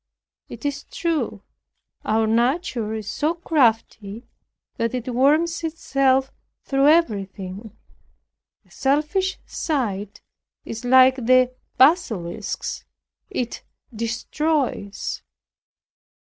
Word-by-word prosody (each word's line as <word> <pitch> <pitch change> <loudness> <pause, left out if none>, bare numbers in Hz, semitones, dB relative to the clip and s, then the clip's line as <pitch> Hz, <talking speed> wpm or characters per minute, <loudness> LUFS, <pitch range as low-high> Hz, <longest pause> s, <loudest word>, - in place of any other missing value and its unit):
It - - -9
is 285 -1 -3
true, 320 - -2 0.6
our 220 +1 +1
nature 235 - 0
is 215 -2 -6
so 315 +3 0
crafty 230 - 0 0.5
that 230 +2 -1
it 250 0 -4
worms 310 +7 +2
itself 275 -4 +1 0.3
through 275 0 +2
everything; 205 - 0 0.9
a - - -28
selfish 305 +8 0
sight 210 - -3 0.4
is 225 +1 -6
like 260 +1 +6
the 255 +1 +3 0.2
basilisk's, 220 - +1 0.5
it 240 -2 -3 0.3
destroys. 235 0 -2
255 Hz, 85 wpm, -23 LUFS, 220-300 Hz, 0.9 s, like